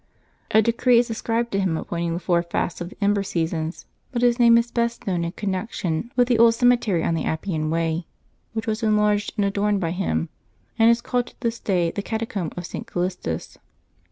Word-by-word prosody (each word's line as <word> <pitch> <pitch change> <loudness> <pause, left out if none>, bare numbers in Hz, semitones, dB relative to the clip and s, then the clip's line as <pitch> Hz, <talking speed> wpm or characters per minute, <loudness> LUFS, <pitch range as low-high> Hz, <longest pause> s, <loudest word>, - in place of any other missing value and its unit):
A 220 - +5
decree 235 +2 +3
is 235 0 +2
ascribed 230 +1 -1
to 195 - 0
him 185 -5 0
appointing 170 0 -3
the - - -2
four 175 -1 +2
fasts 170 0 -3
of 175 - -4
the - - -15
Ember 200 0 +3
seasons, 165 -3 -3 0.3
but 240 -1 -1
his 240 0 +3
name 235 -1 +7
is 235 0 0
best 235 0 -1
known 180 -3 0
in 170 - -2
connection 190 0 -3
with 245 -1 +4
the 240 -3 +2
old 230 0 +6
cemetery 235 -8 +3
on - - +1
the 160 -3 -1
Appian 160 -1 -2
Way, 165 +1 -1 0.5
which 220 -1 -3
was 220 0 -2
enlarged 210 -1 +2
and 205 - +2
adorned 200 +1 +1
by 165 -3 -1
him, 180 -2 -1 0.5
and 225 0 +7
is 235 0 +3
called 245 0 -1
to - - -14
this 230 -1 -1
day 175 -4 +1
the 200 - -3
Catacomb 220 -5 -3
of 175 - -4
St. - - -6
Callistus. 175 - -3
200 Hz, 205 wpm, -23 LUFS, 170-230 Hz, 0.5 s, name